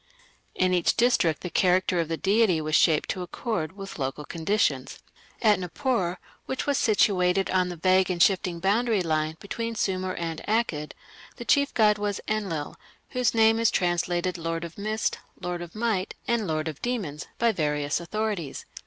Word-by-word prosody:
In 185 0 +2
each 175 -2 +2
district 210 -10 +3
the 180 - -5
character 185 -1 +2
of 165 - 0
the 165 0 -2
deity 200 -3 +3
was 155 0 -4
shaped 155 -1 +4
to 185 - -2
accord 180 -2 -3
with 195 -4 -8
local 135 +2 -3
conditions. 160 -6 0 0.5
At 210 -4 +5
Nippur, 185 0 -1 0.3
which 265 - -3
was 285 -2 +1
situated 195 -3 +2
on 185 -1 +2
the 175 - -5
vague 185 +2 +3
and 180 -2 -1
shifting 180 -2 +2
boundary 210 +2 +2
line 155 -1 -1
between 230 +3 -4
Sumer 185 -3 -1
and 165 -2 -4
Akkad, 205 -9 0 0.4
the 240 - -8
chief 280 +2 +3
god 210 -2 +4
was 205 -1 -2
Enlil, 190 -9 -2 0.3
whose 250 -2 0
name 225 0 +5
is 230 - +4
translated 175 0 0
"lord 165 0 -3
of 170 -1 -7
mist", 215 +2 -2 0.2
"lord 175 -1 -4
of 175 +2 -9
might", 215 -4 -1
and 235 -4 +1
"lord 155 0 -1
of 155 -3 -6
demons" 195 -12 -3
by 235 0 +3
various 150 -5 -1
authorities. 195 -4 -3
185 Hz, 170 wpm, -26 LUFS, 165-215 Hz, 0.5 s, At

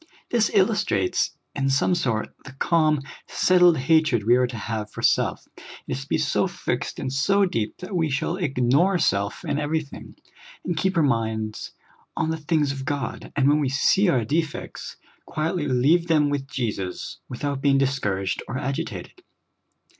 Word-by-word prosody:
This 230 -3 +3
illustrates, 195 - +1 0.2
in 135 -1 0
some 135 +6 +2
sort, 125 -11 -1
the 140 - -11
calm, 155 0 +2 0.2
settled 180 -2 +4
hatred 135 -4 +2
we 120 +3 +5
are 125 0 +3
to 120 - -7
have 110 0 -4
for - - -8
self. - - +1
It - - -15 0.3
is 135 - -2
to 135 - -10
be - - +2
so - - +1
fixed - - -3
and 130 - -4
so 195 +9 +3
deep 115 - -2
that 180 +2 -7
we 165 -3 +1
shall 145 +6 -1
ignore 145 +3 +2
self 100 - 0
in 145 -2 -1
everything, 150 -1 -4 0.5
and 175 - -1
keep 185 +3 0
our 165 - +4
minds 110 -5 -1 0.4
on 160 - 0
the 160 - -2
things 150 -2 0
of 135 -1 -5
God, 140 -1 -4
and 140 -1 +3
when 145 +1 +4
we 140 -3 0
see 180 +8 +3
our 125 -9 +2
defects, 155 +4 -3 0.3
quietl}^ 155 -1 -1
leave 165 +6 +3
them 150 -3 +3
with 140 -1 -2
Jesus, 105 -9 -4
without 140 +2 -3
being 140 -1 +3
divScouraged 105 -9 0
or - - -5
agi 135 +1 -2
tated. - - -9
140 Hz, 170 wpm, -24 LUFS, 125-165 Hz, 0.5 s, we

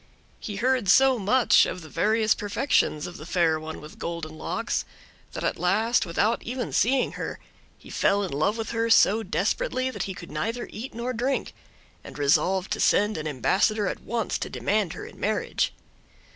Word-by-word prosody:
He 205 - -6
heard 245 -2 +1
so 265 +3 +5
much 230 +5 +4
of 180 - -5
the 160 - -11
various 220 +6 +2
perfections 205 - 0
of 175 - -8
the 155 - -10
Fair 165 -3 +2
One 160 0 -7
with 150 +1 -12
Golden 170 -2 -5
Locks, - - -2 0.5
that - - -5
at - - -1
last, 215 +7 +2
without 210 +7 +1
even 245 0 -4
seeing 255 +3 +2
her, - - -5 0.4
he - - -14
fell 200 +1 +2
in 190 - -4
love 155 +10 0
with 225 -1 -4
her 230 0 0
so 225 -1 +5
desperately 260 - -1
that - - -4
he 190 - -5
could 170 - -10
neither 230 +3 -3
eat 230 +2 -7
nor 240 +2 -3
drink, 255 +4 -1 0.5
and - - -11
resolved 170 +6 +2
to - - -1
send 210 +1 +3
an 155 0 -4
ambassador 200 - +1
at - - -3
once 230 0 -2
to - - -4
demand 205 -5 0
her - - -8
in - - -13
marriage. 215 0 0
210 Hz, 185 wpm, -26 LUFS, 175-235 Hz, 0.5 s, so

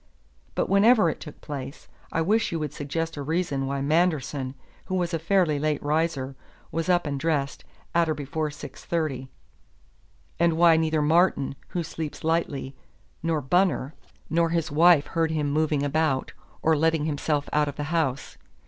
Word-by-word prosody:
But - - 0
whenever 200 -2 +5
it - - -9
took 150 - -11
place, 140 -1 -7 0.2
I 165 - +1
wish 215 +6 +2
you 165 - -1
would 150 -3 -3
suggest 160 +3 -3
a - - -3
reason 145 -3 -1
why 140 0 -2
Manderson, 145 -4 0 0.3
who 185 - -3
was 175 -1 -1
a 165 - 0
fairly 165 -3 +2
late 150 -1 0
riser, 145 -3 0 0.4
was 165 +3 -2
up 175 -1 +3
and 140 -2 -2
dressed 145 -3 -1 0.3
at 170 -1 +3
or 155 - +1
before 150 +2 -3
six 150 - -10
thirty; 140 -6 -2 1.1
and 170 -1 +4
why 170 -1 +6
neither 160 -1 +1
Martin, 160 -3 +3
who 175 - -3
sleeps 160 -1 -6
lightly, 150 -4 -1 0.5
nor 165 -2 0
Bunner, 160 -1 +1 0.3
nor 165 0 +2
his 165 -1 -1
wife 160 0 +6
heard 165 -1 0
him 150 -2 -1
moving 150 -1 +1
about, 145 -2 0 0.3
or 160 0 +4
letting 160 0 +2
himself 145 -1 -1
out 150 0 +3
of 145 - -4
the 150 - -3
house. 140 -5 -1
155 Hz, 165 wpm, -26 LUFS, 145-165 Hz, 1.1 s, why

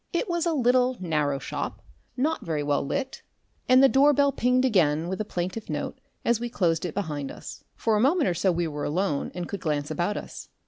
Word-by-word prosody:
It 345 +7 -1
was 345 -1 0
a 335 - +1
little, 250 -2 +2
narrow 150 -6 0
shop, - - -5 0.3
not 310 +5 0
very 155 -3 -2
well 145 0 +1
lit, 265 - -3 0.5
and 255 +1 +7
the - - +9
door 280 +2 +5
bell 280 0 +3
pinged 250 0 +2
again 165 - +2
with 190 +3 -2
a - - -3
plaintive 185 +3 -4
note - - -4 0.3
as 235 -1 +2
we 240 0 -3
closed 170 -7 0
it 170 - -5
behind 150 -8 -3
us. - - -9
For 225 -1 +1
a - - +2
moment 300 - +3
or 180 - +2
so 180 +3 +1
we 170 -1 -1
were 150 -1 -5
alone 165 -2 -1
and 175 -1 -4
could 200 - -5
glance 150 -3 -1
about 180 +4 -1
us. - - -8
200 Hz, 220 wpm, -26 LUFS, 160-255 Hz, 0.5 s, the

